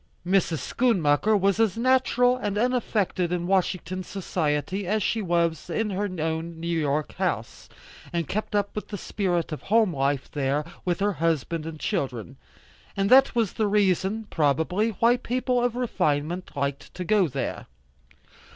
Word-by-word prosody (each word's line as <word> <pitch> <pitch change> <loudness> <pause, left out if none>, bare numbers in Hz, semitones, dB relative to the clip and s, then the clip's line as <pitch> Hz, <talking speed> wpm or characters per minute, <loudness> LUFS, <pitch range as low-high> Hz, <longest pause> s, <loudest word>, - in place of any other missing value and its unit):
Mrs. 180 -3 +2 0.2
Schoonmaker 210 -4 +3
was 195 +2 +2
as 225 -3 +2
natural 250 0 +3
and 205 -5 -3
unaffected 210 -7 0
in 175 -1 -1
Washington 185 0 0
society 180 0 -2
as 215 +1 +1
she 225 - 0
was 170 -3 0
in 220 -2 -1
her 200 +2 -1
own 160 +1 -3
New 170 +1 -2
York 150 -1 -1
house, - - -3 0.4
and 170 -3 -2
kept 215 0 -3
up 205 -1 0
the 205 - -5
spirit 180 -5 -1
of 155 - -5
home 215 -5 +2
life 140 0 0
there, 145 +1 -1 0.2
with 175 0 -1
her 205 0 +2
husband 165 -1 -1
and 160 -1 -7
children. 120 -11 -3 0.6
And 195 +2 +1
that 265 0 +6
was 225 -5 +1
the 215 - 0
reason, 200 +1 +1
probably, 160 +8 +1
why 230 +4 +3
people 250 0 0
of 245 -1 0
refinement 180 -8 -1
liked 140 0 -3
to 180 - -4
go 200 0 +3
there. 135 -1 -4
185 Hz, 150 wpm, -25 LUFS, 160-215 Hz, 0.6 s, that